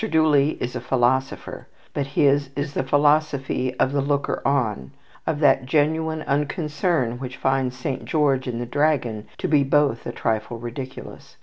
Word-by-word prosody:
Dooley 155 -2 +3
is 125 - -4
a - - -3
philosopher, 130 +1 -1 0.3
but 140 -1 -2
his 140 -1 +3
is 145 0 -3
the - - 0
philosophy 145 -2 +1
of 130 - +1
the 140 0 +1
looker 140 0 -1
on, 110 - 0 0.4
of 155 - 0
that 135 -3 +4
genuine 160 +2 +1
unconcern 150 -3 -1
which 130 0 -6
finds 130 -1 0
Saint 130 0 -4
George 140 -4 +1
and 120 -2 -3
the 120 - -3
dragon 125 -6 0
to - - -2
be 150 -2 +4
both 140 -3 +1
a - - -3
trifle 110 +1 -2
ridiculous. 120 +3 -8
140 Hz, 160 wpm, -23 LUFS, 125-150 Hz, 0.4 s, that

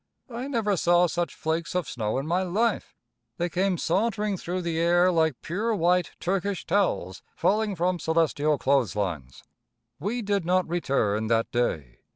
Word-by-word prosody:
I 240 +3 -4
never 225 -7 0
saw 175 +2 +4
such 175 -2 -2
flakes 160 +2 -2
of 180 -5 0
snow 110 0 -2
in 135 - -2
my 175 +4 +1
life. 205 +6 -1 0.4
They 175 0 -1
came 185 +1 0
sauntering 210 +4 0
through 180 0 -4
the 165 -1 -1
air 175 +2 +4
like 160 -6 +1
pure, 215 +7 -1
white 180 0 +1
Turkish 195 +1 -2
towels 100 - 0
falling 210 0 +1
from 175 +1 0
celestial 155 -2 +1
clothes 135 -5 +1
lines. 80 -11 -4 0.6
We 220 +9 -2
did 200 -2 0
not 180 +1 +1
return 115 -11 0
that 115 0 +1
day. 80 - -2
175 Hz, 160 wpm, -26 LUFS, 145-195 Hz, 0.6 s, saw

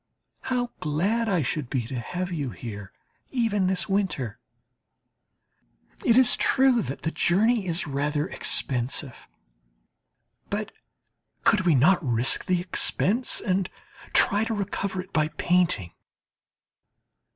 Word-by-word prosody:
How 245 -1 -2
glad 200 +10 0
I 180 -6 +1
should 135 0 -3
be 125 -5 -2
to 125 +1 -5
have 180 +9 -4
you 145 -6 -3
here, 105 -5 -8 0.4
even 225 -7 0
this 185 -1 -1
winter! 190 - -2 1.6
It 235 - +4
is 260 -1 +5
true 260 -3 +3
that 135 - -6
the 160 - -1
journey 210 +5 +2
is 170 +1 -1
rather 145 +1 -1
expensive. 130 -4 -1 1.2
But - - -3 0.7
could 185 -4 +3
we 165 - +5
not 165 +8 +4
risk 120 -1 +3
the 180 -1 +1
expense 200 +6 +1
and 190 -2 0 0.4
try 205 +2 +3
to 225 0 -2
recover 200 -1 -3
it 185 +1 -16
by 155 0 +2
painting? 170 - 0
180 Hz, 120 wpm, -25 LUFS, 140-205 Hz, 1.6 s, is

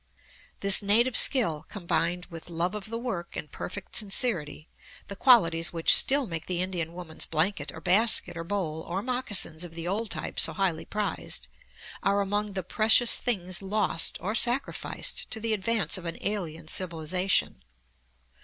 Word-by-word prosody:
This 195 -1 +7
native 225 +4 +2
skill 165 - +5
combined 175 -2 -2
with 165 +1 -9
love 170 +2 -2
of 210 0 -7
the 230 - -4
work 210 -8 -6
and 150 - -7
perfect 195 +1 -8
sincerity 185 - +1 0.4
the 200 - -6
qualities 170 -9 +4
which 165 -2 +4
still 275 0 +4
make 165 -6 -6
the 180 -1 -2
Indian 175 -3 -3
woman's 175 -3 -2
blanket 175 +6 -1
or - - -11
basket 205 +2 +3
or 165 - -6
bowl 165 -4 -4
or 190 +4 -4
moccasins 215 -10 -1
of 170 -2 -10
the 165 0 -6
old 210 +4 -3
type - - -5
so - - +5
highly 175 -5 -2
prized 210 -1 -4 0.5
are 200 0 +1
among 205 +1 -2
the 190 -1 -4
precious 225 +5 +4
things 185 -7 -1
lost 195 -4 0
or 200 +5 -4
sacrificed 240 +3 -1
to 220 - -2
the 225 0 -2
advance 205 -4 -1
of 175 - -13
an 165 - -5
alien 165 -6 -4
civilization. 180 - -2
190 Hz, 160 wpm, -26 LUFS, 170-215 Hz, 0.5 s, This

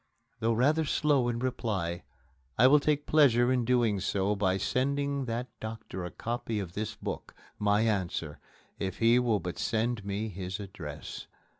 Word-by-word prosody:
Though 115 +1 +2
rather 145 +8 +3
slow 145 -4 +2
in 120 - -1
replying, 105 -9 -2 0.6
I 125 - +6
will 145 +3 +7
take 145 0 0
pleasure 125 -5 +5
in 125 -2 +1
doing 120 -4 +2
so 100 +1 0
by 95 -2 +1
sending 140 +5 0
that 120 +1 -2
doctor 110 -4 -6
a 90 - -4
copy 115 0 -3
of 90 -4 -5
this 105 +2 -3
book - - -6 0.2
my 105 0 +3
answer 95 -8 -1 0.4
if 95 -2 -3
he 115 +2 +5
will 115 -4 +2
but 90 -1 -5
send 115 -1 0
me 100 +2 -3
his 95 0 -5
address. 90 -7 -7
115 Hz, 160 wpm, -30 LUFS, 100-125 Hz, 0.6 s, will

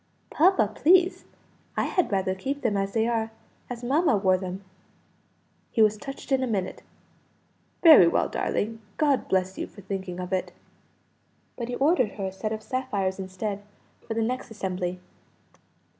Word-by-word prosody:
"Papa, 295 - +4
please, 360 - +4 0.5
I - - +2
had 365 - 0
rather 190 -1 +1
keep 270 +10 -4
them 220 -4 +1
as 195 0 -1
they 225 -1 +2
are 225 -2 0 0.4
as 245 -1 -6
mamma 280 0 +3
wore 190 -2 +3
them." 185 +1 -5 1.1
He 225 - +3
was 215 0 +4
touched 275 +5 -9
in 265 -1 +3
a 260 - 0
minute. 195 -5 -2 1.0
"Very 310 - +9
well, - - +2
darling. 225 +2 -2 0.2
God 290 -3 +2
bless 190 0 0
you - - -3
for 200 - -14
thinking 190 -2 -5
of 180 +1 -4
it!" 185 - -1 1.0
But 235 - -4
he 245 - -3
ordered 275 - +2
her 195 - -4
a 190 - -3
set 215 +3 -4
of 220 0 -4
sapphires 205 -8 -2
instead, 195 +2 -4 0.5
for 225 - -3
the 225 - +1
next 255 +2 -3
assembly. 185 -4 -3
215 Hz, 160 wpm, -26 LUFS, 190-255 Hz, 1.1 s, Very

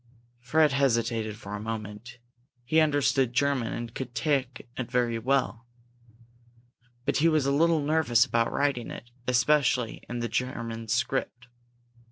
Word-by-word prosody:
Fred 150 +5 +3
hesitated 115 -5 0
for 105 -2 -9
a 105 - -4
moment. 110 +1 -6 0.5
He 155 +5 +3
understood 140 -5 +2
German 130 -2 +1
and 115 -1 -5
could 125 -2 -6
talk 135 -4 0 0.2
it 130 -2 -4
very 120 -2 +1
well. 125 -1 0 1.4
But 140 - +1
he 160 - +4
was 155 -4 +2
a 140 - +2
little 160 +2 +3
nervous 145 -6 +3
about 115 0 0
writing 140 -4 0
it, 120 - -9 0.2
especially 125 -1 +2
in 120 - -4
the 120 0 -2
German 115 -1 -3
script. 125 +2 -2
125 Hz, 140 wpm, -27 LUFS, 115-140 Hz, 1.4 s, he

